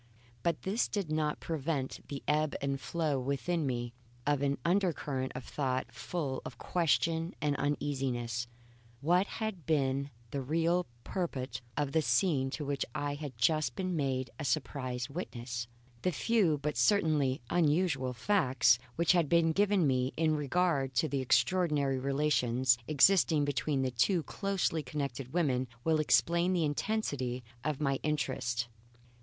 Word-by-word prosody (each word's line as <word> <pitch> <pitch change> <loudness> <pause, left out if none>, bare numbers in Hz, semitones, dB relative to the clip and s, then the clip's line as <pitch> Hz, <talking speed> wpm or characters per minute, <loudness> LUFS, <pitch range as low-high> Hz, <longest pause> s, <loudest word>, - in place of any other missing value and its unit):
But 170 +7 -1
this 200 +5 +1
did 195 -7 -3
not 155 -1 0
prevent 150 -4 -2
the 140 -1 -6
ebb 150 0 +1
and 140 0 -2
flow 150 +1 -1
within 140 +4 -1
me 120 -2 -2 0.3
of 145 -1 +1
an 140 0 +1
undercurrent 165 -8 0
of 125 - -5
thought 130 -4 -2
full 130 +3 -3
of 115 - -8
question 165 +1 +1
and 145 -1 +1
uneasiness. 130 -5 -1 0.5
What 180 +6 +3
had 215 -8 -5
been 140 -3 +1 0.2
the 140 - -2
real 165 +6 +1 0.2
purport 140 -9 -3 0.2
of 145 -2 0
the 160 - +3
scene 135 +1 +2
to 145 +2 -4
which 140 -1 -1
I 145 0 -1
had 145 -4 -7
just 155 +6 +2
been 185 -2 -2
made 130 -4 -1
a - - -3
surprised 130 -1 -2
witness? 120 -7 -5 0.3
The 180 - +1
few, 185 -3 +2
but 145 -2 -3
certainly 145 - +3
unusual, 155 -5 +2
facts 125 - +3 0.2
which 170 0 +3
had 170 -5 +3
been 165 -1 +4
given 200 0 +3
me 130 -1 +1
in 160 -1 +2
regard 145 -2 0
to 150 +7 +2
the 140 -2 -1
extraordinary 140 +1 +2
relations 130 -3 +2
existing 155 0 +4
between 145 -1 0
these 130 -1 -1
two 170 +6 +3
closely 195 -5 -1
connected 135 -2 -4
women 135 -7 +1 0.2
will 160 -1 +2
explain 170 +4 +3
the 170 -3 +2
intensity 145 - -2 0.2
of 150 -1 -1
my 135 -3 0
interest. 130 -5 -1
145 Hz, 145 wpm, -32 LUFS, 130-165 Hz, 0.5 s, been